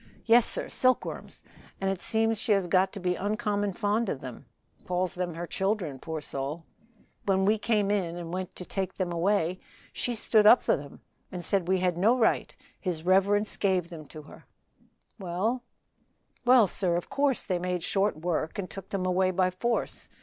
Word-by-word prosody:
"Yes, 235 0 +6
sir, - - -3
silkworms, 255 0 -1 0.4
and 195 0 0
it 195 - -4
seems 225 -1 +1
she 225 -1 +2
has 195 -2 +1
got 185 +2 +2
to - - -6
be 180 -1 0
uncommon 205 +1 -1
fond 210 +2 0
of 135 - -3
them, 130 -3 -9 0.4
calls 180 +1 -1
'em 180 -2 -3
her 170 +1 -4
children, 190 -7 -2
poor 160 +1 -5
soul. 145 +4 -5 0.6
When 190 -1 +3
we 215 +2 +3
came 205 -2 +1
in 180 -5 -1
and 175 -1 -6
went 185 0 -4
to 180 - -8
take 190 0 -3
them 185 -2 -2
away 180 0 +1 0.3
she 245 - -2
stood 215 -1 +4
up 240 - +7
for - - +1
'em 140 -1 -13 0.3
and 175 -2 -4
said 190 -2 +2
we 185 0 +2
had 180 -2 0
no 225 +7 +4
right 230 - +1 0.2
his 170 -4 -3
reverence 200 +3 +3
gave 185 -4 +1
them 155 -3 -9 0.2
her." - - -15 0.7
"Well?" 195 +7 -1 0.8
"Well, 245 -2 +7
sir, 180 -2 0
of 175 - -4
course 280 -2 +1
they 180 -3 -1
made 180 -1 -2
short 200 -1 0
work 160 +2 -2
and 195 -2 -3
took 195 0 -9
them 190 -2 -2
away 185 +1 +2
by 185 0 +1
force. 235 +6 -2
190 Hz, 185 wpm, -28 LUFS, 175-210 Hz, 0.8 s, up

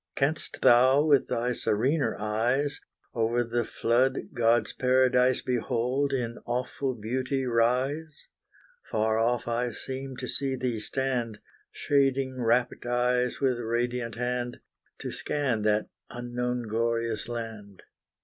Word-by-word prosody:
Canst 145 +3 -1
thou, 130 +4 +6
with 145 -4 +4
thy 120 +2 0
serener 130 +8 0
eyes, 120 +8 0 0.3
Over 115 +1 +1
the 120 0 -1
flood 125 +4 0
God's 115 -2 +2
paradise, 130 0 +3
Behold 125 +3 0
in 120 -3 -2
awful 125 +2 -2
beauty 130 +4 -2
rise? 130 +6 0 0.6
Far 110 +1 +1
off 120 +2 +1
I 120 +1 0
seem 130 +2 -6
to 125 - -4
see 135 0 -1
thee 125 -3 -2
stand, 120 -2 -2 0.3
Shading 135 -2 +1
rapt 120 +2 +1
eyes 125 0 +1
with 130 -3 +1
radiant 120 +1 -2
hand, 125 0 -2 0.4
To - - -4
scan 130 -7 -1
that 105 0 +1 0.2
unknown 120 0 -3
glorious 115 0 -1
land. 110 -4 -7
125 Hz, 120 wpm, -28 LUFS, 115-130 Hz, 0.6 s, thou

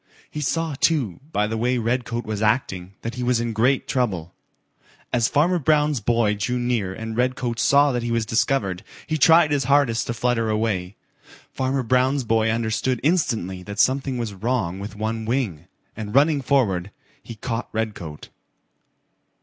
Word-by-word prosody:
He 150 - -4
saw, 165 +2 -1
too, 135 - +1
by 105 - +1
the 110 +1 -3
way 125 +2 +1
Redcoat 120 0 -2
was 110 -1 -3
acting, 100 -5 0
that 115 - -3
he 125 - -5
was 125 -1 +2
in 115 -1 -2
great 125 +5 +2
trouble. 100 - -1 0.8
As 120 -2 +3
Farmer 170 +7 +2
Brown's 150 -2 +2
boy 115 0 +2
drew 105 +5 -2
near 120 -6 -1
and 110 +3 -6
Redcoat 125 -1 -1
saw 140 +1 +4
that 120 -1 -1
he 120 - -3
was 115 -1 0
discovered, 110 -6 0 0.2
he 155 - -2
tried 160 +2 +6
his 140 -3 +1
hardest 135 -4 +2
to 120 - -2
flutter 120 -2 0
away. 105 -4 -1 0.6
Farmer 130 0 -1
Brown's 130 +3 +2
boy 110 -1 +2
understood 115 +2 0
instantly 115 - 0
that 100 +2 -8
something 135 +2 +1
was 115 -4 -3
wrong 95 -3 -2
with 100 +1 -7
one 110 +1 -3
wing, 110 - -2 0.3
and 105 0 -6
running 145 +1 +4
forward, 105 -9 +1 0.3
he 115 - -9
caught 115 +2 -4
Redcoat. 105 -9 -5
115 Hz, 165 wpm, -23 LUFS, 110-130 Hz, 0.8 s, tried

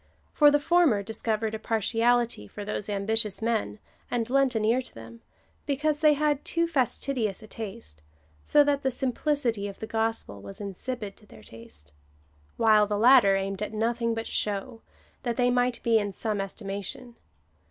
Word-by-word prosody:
For 295 -1 +6
the 290 - +4
former 290 -10 +3
discovered 220 +1 -2
a 220 - -4
partiality 230 - +1
for 205 - -8
those 210 0 -4
ambitious 210 0 +1
men, 225 -2 -1 0.3
and 235 -2 -1
lent 270 -2 +2
an 215 -1 0
ear 235 +4 +2
to - - -11
them/ 115 0 -12 0.5
because 295 +1 0
they 305 -1 +5
had 295 -1 0
too 335 0 0
fastidious 255 - -1
a - - -11
taste, 215 - -8 0.4
so 295 - +5
that 285 -1 0
the 265 - +1
simplicity 255 -4 0
of 200 - -9
the - - -5
gospel 225 - -2
was 100 0 -10
insipid 205 +1 -5
to 210 - -18
their 110 - -15
taste; 75 -12 -13 0.7
while 215 -2 +4
the 205 0 -1
latter 230 -3 +6
aimed 195 0 -3
at 210 - -4
nothing 230 +1 -1
but 225 0 -4
show, 210 +3 -3 0.4
that 240 -2 -2
they 245 0 +2
might 245 0 +1
be 230 -1 +3
in 205 -1 -3
some 210 0 -2
estimation. 200 +4 -6
225 Hz, 170 wpm, -27 LUFS, 205-250 Hz, 0.7 s, For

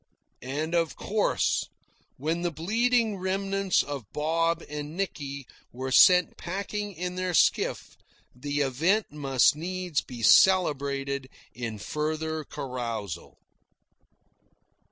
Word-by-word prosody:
And 150 +6 -3
of 165 -2 +1
course, 210 0 0 0.5
when 160 +5 -1
the 175 - 0
bleeding 220 +6 +1
remnants 195 0 0
of 140 -8 -7
Bob 165 +2 0
and 150 +2 -6
Nicky 140 -8 -4 0.3
were 130 +2 -5
sent 180 +6 +6
packing 200 +3 -4
in 180 +1 -4
their 185 -1 -1
skiff, - - +1 0.4
the 145 +3 -2
event 165 - +1
must 140 -3 +3
needs 180 0 -2
be 120 -3 -9
celebrated 140 -6 +3 0.2
in 115 -3 -5
further 155 +5 -3
carousal. 120 - -5
155 Hz, 105 wpm, -27 LUFS, 140-185 Hz, 0.5 s, sent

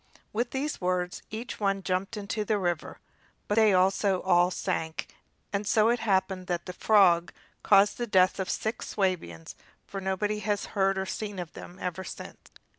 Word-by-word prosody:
With 235 +3 0
these 275 -1 -3
words 180 0 -1
each 230 +3 -6
one 195 -2 0
jumped 185 +3 -2
into 210 +1 -3
the 210 0 +1
river, 175 -4 -2 0.5
but - - 0
they 215 -1 +5
also 190 0 +2
all 175 -1 +4
sank; 160 -3 -3 0.4
and 200 0 -1
so 215 +1 +4
it 240 0 +2
happened 190 -3 0
that 175 -1 -2
the 180 - -6
frog 180 -4 +4 0.3
caused 205 +3 +4
the 240 - -1
death 185 -2 +3
of 190 - -2
six 220 +1 -2
Swabians, 165 - -2 0.3
for 195 - -6
nobody 205 +3 -1
has 205 -1 -2
heard 195 -1 +2
of 190 - 0
or - - -6
seen 205 +1 -4
them 175 0 -8
ever 180 0 -4
since. - - -10
195 Hz, 175 wpm, -28 LUFS, 185-210 Hz, 0.5 s, they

